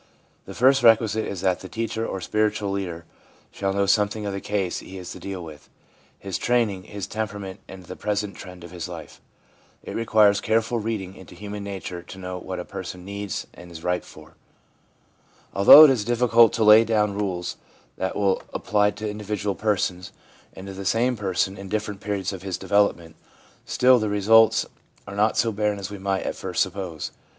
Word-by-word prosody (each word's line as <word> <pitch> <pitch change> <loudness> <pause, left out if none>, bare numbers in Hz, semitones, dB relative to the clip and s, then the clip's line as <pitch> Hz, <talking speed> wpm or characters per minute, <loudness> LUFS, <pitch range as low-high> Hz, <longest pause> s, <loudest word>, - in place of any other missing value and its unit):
The - - -9
first 130 +2 +4
requisite 110 -1 +4
is 95 -3 -5
that 95 -2 +1
the 95 - -10
teacher 115 0 -3
or 95 - -4
spiritual 105 +1 0
leader 90 -4 -4 0.5
shall 95 -1 -2
know 100 0 +1
something 105 +1 +1
of 100 - -3
the 100 - -4
case 100 -4 -2
he 95 - -10
is 90 -1 -8
to - - -9
deal 95 -2 -6
with 75 -3 -12 0.2
— - - -33
his 95 -2 -5
training, 110 -6 0
his 100 -2 -6
temperament, 105 -3 -5
and 95 -1 -11
the - - -8
present 105 -1 -2
trend 90 -2 -11
of 85 - -10
his 90 -1 -6
life. 80 -4 -10 0.6
It - - -7
requires 110 -3 +3
careful 115 +2 +1
reading 105 -4 -4
into 90 -1 -13
human 105 +2 -7
nature 95 -3 -6
to 90 - -12
know 90 -1 -6
what 95 +1 -6
a 90 - -5
person 90 -2 -8
needs, 100 0 -5
and 90 0 -13
is 80 -1 -10
ripe 90 0 -1
for. - - -15 1.2
Although 100 +10 +10
it 150 - +8
is 120 -5 0
difficult 120 -1 +4
to 115 - +1
lay 105 +1 +8
down 105 -2 +1
rules 95 -4 -3 0.4
that 95 0 -2
will 100 -2 +1
apply 105 -1 +2
to 105 +1 -6
individual 105 -1 -3
persons, 95 -2 -1 0.4
and 95 - -9
to 100 - -7
the 95 +1 -7
same 120 +5 +1
person 95 -2 -1
in 100 -1 -8
different 105 -1 -3
periods 100 -1 -2
of 95 - -7
his 95 -2 -4
development, 100 -5 0 0.5
still 125 0 +4
the 110 -1 -1
results 110 +2 +4 0.4
are 100 - -8
not 105 +2 +2
so 115 - +2
barren 105 0 -1
as 100 0 -6
we 100 - -7
might 95 0 -1
at - - -3
first - - 0
suppose. 95 -4 -6
100 Hz, 195 wpm, -24 LUFS, 95-105 Hz, 1.2 s, Although